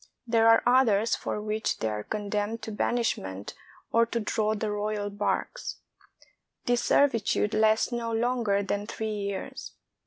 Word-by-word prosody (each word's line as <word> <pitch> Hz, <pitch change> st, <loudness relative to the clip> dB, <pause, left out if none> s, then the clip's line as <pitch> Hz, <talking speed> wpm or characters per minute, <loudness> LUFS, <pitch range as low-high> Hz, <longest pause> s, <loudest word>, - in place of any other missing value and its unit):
There 230 Hz, -1 st, +3 dB
are 225 Hz, 0 st, +6 dB
others 230 Hz, -4 st, +4 dB
for -, -, -4 dB
which 215 Hz, +1 st, -2 dB
they 110 Hz, -, -2 dB
are 105 Hz, -1 st, -3 dB
condemned 210 Hz, -, -3 dB
to 220 Hz, -, -5 dB
banishment 205 Hz, -, -2 dB, 0.4 s
or 230 Hz, 0 st, +4 dB
to 235 Hz, -, -2 dB
draw 215 Hz, 0 st, 0 dB
the 215 Hz, 0 st, -2 dB
royal 210 Hz, 0 st, -2 dB
barques. 205 Hz, -, -2 dB, 0.9 s
This 245 Hz, 0 st, +2 dB
servitude 230 Hz, -6 st, +2 dB
lasts 220 Hz, +2 st, +3 dB
no 235 Hz, -1 st, -2 dB
longer 225 Hz, -3 st, +1 dB
than 205 Hz, +1 st, -2 dB
three 220 Hz, -1 st, -3 dB
years. 200 Hz, -2 st, -5 dB
215 Hz, 145 wpm, -28 LUFS, 205-230 Hz, 0.9 s, are